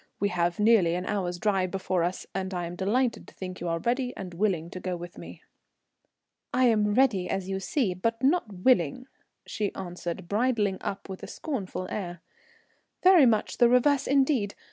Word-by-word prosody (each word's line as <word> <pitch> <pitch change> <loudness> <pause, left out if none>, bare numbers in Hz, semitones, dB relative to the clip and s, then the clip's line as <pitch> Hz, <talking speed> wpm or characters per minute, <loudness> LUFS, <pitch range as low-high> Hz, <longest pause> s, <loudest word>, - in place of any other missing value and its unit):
"We 200 - +1
have 175 0 0
nearly 210 -6 +4
an 180 +1 -3
hour's 180 -4 -2
drive 190 -1 +1
before 185 -1 -1
us, 175 +2 -2
and 190 0 -3
I 175 -1 -2
am 170 +1 -6
delighted 230 +6 0
to - - -16
think 185 -1 -6
that - - -15
you 175 - -3
are 165 0 0
ready 245 +7 -1
and 185 -2 -7
willing 175 -3 -1
to 185 - -6
go 180 -1 -3
with 175 0 -9
me." - - -11 1.1
"I 255 +1 +3
am 210 -3 +3
ready, 230 -9 +3
as 190 -1 -2
you 190 0 -2
see, 205 -1 0
but 230 +7 -2
not 280 -5 +2
willing," 195 - +2 0.4
she 210 -2 -2
answered, 175 -1 -6
bridling 210 -2 +1
up 195 - -5
with 190 -1 -8
a - - -7
scornful 200 - -4
air. 175 -5 -5 0.8
"Very 365 -7 +7
much 215 -2 0
the 240 -1 +6
reverse 265 +3 +3
indeed. 265 -7 +2
195 Hz, 190 wpm, -27 LUFS, 180-240 Hz, 1.1 s, Very